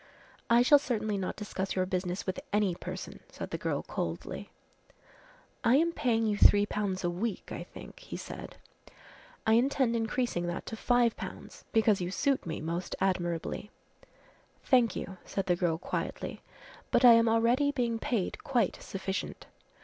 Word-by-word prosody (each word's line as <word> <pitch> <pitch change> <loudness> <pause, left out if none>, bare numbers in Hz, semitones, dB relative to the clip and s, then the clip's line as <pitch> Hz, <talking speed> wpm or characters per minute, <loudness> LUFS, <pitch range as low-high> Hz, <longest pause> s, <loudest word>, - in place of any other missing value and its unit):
"I 235 +1 +6
shall 290 +3 +7
certainly 215 -6 -1
not 190 -2 -2
discuss 195 -2 -4
your 185 -1 +1
business 185 0 -2
with 185 - -2
any 205 -3 +2
person," - - -7
said - - -7
the - - -2
girl - - -1
coldly. - - -4 1.1
"I 235 - +5
am 330 +4 +3
paying 230 -8 +1
you 210 -1 0
3 205 0 +7
pounds 200 -3 -2
a 175 - +1
week, 200 +4 -3
I - - -4
think," - - -12
he - - -7
said. - - -8 0.9
"I 220 - +4
intend 250 0 +3
increasing 225 -5 -1
that 175 - -4
to 225 - -5
5 240 0 +2
pounds - - -8
because 220 -4 +3
you 175 - -2
suit 270 +3 0
me 160 - -3
most 170 +3 -3
admirably." 180 +1 -1 0.9
"Thank 245 -3 +4
you," 190 - -5
said 195 - -3
the 180 - +2
girl 170 -2 0
quietly, 170 - -4 0.5
"but 250 - +4
I 240 - +11
am 230 0 +5
already 235 +5 +3
being 235 -5 -1
paid 220 -7 -2
quite 240 -8 0
sufficient." 190 0 -4
210 Hz, 160 wpm, -30 LUFS, 185-235 Hz, 1.1 s, I